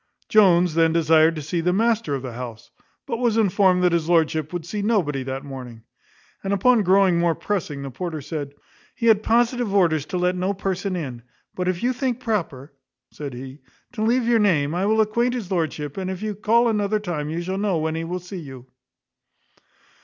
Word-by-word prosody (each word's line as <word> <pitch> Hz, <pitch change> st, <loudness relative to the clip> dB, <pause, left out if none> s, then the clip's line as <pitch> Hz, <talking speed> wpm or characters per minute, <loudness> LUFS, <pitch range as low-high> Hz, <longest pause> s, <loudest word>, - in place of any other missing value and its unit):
Jones 180 Hz, -5 st, +4 dB
then 165 Hz, 0 st, +3 dB
desired 160 Hz, 0 st, +4 dB
to 155 Hz, -, -5 dB
see 165 Hz, +4 st, -2 dB
the 180 Hz, +2 st, +1 dB
master 220 Hz, -6 st, +1 dB
of 135 Hz, -, -5 dB
the 125 Hz, -3 st, -6 dB
house; 120 Hz, -1 st, -8 dB, 0.3 s
but 230 Hz, -, -3 dB
was 235 Hz, -3 st, +1 dB
informed 190 Hz, -3 st, +3 dB
that 180 Hz, -, +4 dB
his 170 Hz, -1 st, 0 dB
lordship 160 Hz, -2 st, +2 dB
would 175 Hz, -2 st, -5 dB
see 205 Hz, +4 st, -4 dB
nobody 185 Hz, -, 0 dB
that 135 Hz, +1 st, -5 dB
morning. 125 Hz, -5 st, -9 dB, 0.6 s
And 195 Hz, -, -2 dB
upon 230 Hz, +4 st, +4 dB
growing 190 Hz, -2 st, +4 dB
more 170 Hz, -1 st, +2 dB
pressing 150 Hz, -9 st, -3 dB
the 135 Hz, -, -6 dB
porter 160 Hz, +4 st, -5 dB
said, 145 Hz, -1 st, -6 dB, 0.4 s
"he 230 Hz, -, -3 dB
had 220 Hz, -2 st, +5 dB
positive 240 Hz, 0 st, +1 dB
orders 160 Hz, -6 st, +2 dB
to 180 Hz, -, -3 dB
let 180 Hz, +1 st, +1 dB
no 185 Hz, +2 st, -1 dB
person 190 Hz, 0 st, -2 dB
in; 130 Hz, -9 st, -5 dB, 0.3 s
but 180 Hz, 0 st, -3 dB
if 185 Hz, +1 st, -1 dB
you 250 Hz, +1 st, +2 dB
think 255 Hz, -1 st, -2 dB
proper," 165 Hz, -, -3 dB, 0.4 s
said 140 Hz, -4 st, -7 dB
he, 130 Hz, +3 st, -9 dB, 0.3 s
"to 230 Hz, -, -6 dB
leave 235 Hz, +2 st, +2 dB
your 235 Hz, -1 st, +4 dB
name, 160 Hz, -8 st, +2 dB
I 185 Hz, +3 st, 0 dB
will 220 Hz, +1 st, +3 dB
acquaint 235 Hz, +4 st, +1 dB
his 210 Hz, -6 st, -5 dB
lordship; 155 Hz, -4 st, -2 dB
and 190 Hz, -1 st, -3 dB
if 190 Hz, +2 st, -5 dB
you 215 Hz, -1 st, -2 dB
call 230 Hz, +4 st, +2 dB
another 210 Hz, -1 st, 0 dB
time 165 Hz, -7 st, -4 dB
you 165 Hz, +2 st, -3 dB
shall 190 Hz, +2 st, -3 dB
know 200 Hz, -4 st, 0 dB
when 160 Hz, 0 st, -1 dB
he 165 Hz, +1 st, -3 dB
will 175 Hz, +2 st, -3 dB
see 180 Hz, +1 st, -8 dB
you." 135 Hz, -5 st, -10 dB
180 Hz, 205 wpm, -23 LUFS, 155-210 Hz, 0.6 s, had